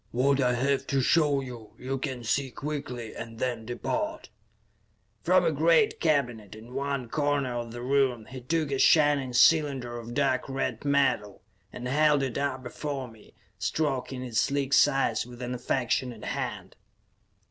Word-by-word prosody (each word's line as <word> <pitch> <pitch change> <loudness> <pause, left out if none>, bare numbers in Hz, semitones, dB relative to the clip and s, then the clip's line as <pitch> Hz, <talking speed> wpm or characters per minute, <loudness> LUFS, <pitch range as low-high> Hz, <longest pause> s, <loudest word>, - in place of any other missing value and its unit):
"What 135 +3 +2
I 125 -1 +2
have 135 +2 0
to 135 - +1
show 145 +1 +3
you, 120 -4 -9
you 135 +1 -4
can 130 -3 -4
see 135 +4 0
quickly, 125 -4 -5
and 115 -1 -8
then 120 -3 -3
depart." 310 - -3 0.9
From - - +3
a - - +3
great 450 -3 +3
cabinet 120 -9 0
in 115 +3 -12
one 140 -2 -2
corner 145 -1 0
of 120 -1 -4
the 120 +1 -7
room 130 -4 +1
he 130 +1 -9
took 155 +3 -1
a 135 - -1
shining 145 -4 +4
cylinder 135 -4 +3
of 120 +1 -8
dark 135 -2 +1
red 135 0 -2
metal, 140 -8 +1 0.3
and 125 - -6
held 150 +1 +3
it 130 -3 -2
up 130 -2 -2
before 130 -1 -5
him, 110 - -18 0.3
stroking 130 +3 -2
its 120 -3 -1
sleek 140 -1 0
sides 135 -6 +3
with 120 -1 -11
an 125 0 -4
affectionate 125 -2 -1
hand. - - -4
130 Hz, 160 wpm, -28 LUFS, 120-140 Hz, 0.9 s, shining